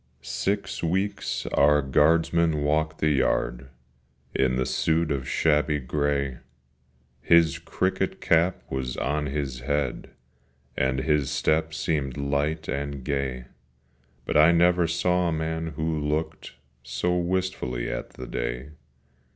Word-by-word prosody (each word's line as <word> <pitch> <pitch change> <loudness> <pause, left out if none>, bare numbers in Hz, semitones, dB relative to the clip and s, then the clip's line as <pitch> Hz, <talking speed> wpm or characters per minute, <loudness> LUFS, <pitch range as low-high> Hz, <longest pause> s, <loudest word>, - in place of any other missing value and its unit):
II 65 - -39
SIX 100 +1 -2
weeks 95 +5 -1
our 75 0 +4
guardsman 80 +2 +3
walked 80 +1 0
the 75 - +3
yard, 65 -2 0 0.7
In 65 -1 +2
the 65 0 0
suit 80 +5 +1
of 65 -2 -2
shabby 75 -1 +2
grey: 70 -1 -1 0.8
His 85 +1 +4
cricket 95 +3 -1
cap 85 +2 +2
was 65 -2 -3
on 75 +2 -1
his 70 -3 -3
head, 70 +2 -2 0.7
And 65 0 0
his 75 -1 +1
step 80 +1 +1
seemed 75 -4 -1
light 75 +3 -1
and 70 0 -3
gay, 65 -3 -2 0.8
But - - +1
I 80 +2 +7
never 85 0 +4
saw 90 +2 +1
a - - 0
man 80 +1 -2
who 80 0 -1
looked 75 +1 -3 0.3
So 90 0 -1
wistfully 90 -9 -1
at - - -4
the 65 - -8
day. - - -4
75 Hz, 125 wpm, -26 LUFS, 65-80 Hz, 0.8 s, I